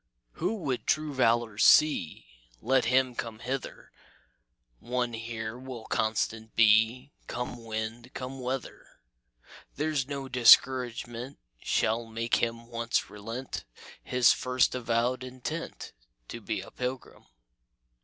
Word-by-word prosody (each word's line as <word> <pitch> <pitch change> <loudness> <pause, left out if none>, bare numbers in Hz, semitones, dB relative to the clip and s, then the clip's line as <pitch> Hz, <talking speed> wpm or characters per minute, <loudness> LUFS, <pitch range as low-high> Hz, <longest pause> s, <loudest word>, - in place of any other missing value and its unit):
"Who 185 - -2
would 140 - -3
true 155 -1 +1
valor 115 -4 +2
see, 95 - +4 0.3
Let 130 +2 +2
him 130 +1 +3
come 115 -2 -5
hither; 130 +4 -5 0.9
One 120 -1 -2
here 115 0 -5
will 130 -3 -8
constant 110 0 -1
be, 110 +5 +4 0.2
Come 120 -1 -5
wind, 110 +2 -5
come 130 +1 -6
weather; 130 0 -5 0.9
There's 150 -3 -1
no 140 -1 -5
discouragement 125 0 +4 0.2
Shall 115 +1 0
make 115 +1 0
him 115 0 -2
once 115 0 -2
relent 115 +5 -6 0.4
His 125 -1 +4
first 125 -1 +1
avowed 120 +1 0
intent 130 +6 -6 0.4
To - - -7
be - - -3
a - - -12
pilgrim. 125 +1 -6
120 Hz, 115 wpm, -29 LUFS, 115-130 Hz, 0.9 s, see